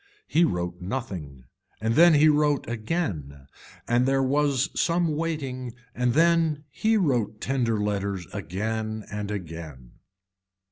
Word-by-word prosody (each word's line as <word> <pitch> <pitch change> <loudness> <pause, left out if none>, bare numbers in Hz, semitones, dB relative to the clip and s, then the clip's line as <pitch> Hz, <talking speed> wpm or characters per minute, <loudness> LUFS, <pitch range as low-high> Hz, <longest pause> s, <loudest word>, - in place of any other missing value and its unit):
He 170 - +3
wrote 90 - -3
nothing 90 - -5 0.4
and 110 +1 0
then 170 +4 +7
he 150 +2 +6
wrote 150 -2 +2
again 110 - -3 0.4
and 120 +2 +2
there 135 0 +2
was 140 +1 +1
some 170 -2 +1
waiting 135 -7 -3 0.2
and 125 -1 +1
then 165 -2 +3
he 220 - +2
wrote 120 - 0
tender 120 -5 0
letters 100 -3 -2
again 110 +3 -3
and 105 0 -4
again. 80 -10 -7
120 Hz, 125 wpm, -26 LUFS, 100-150 Hz, 0.4 s, then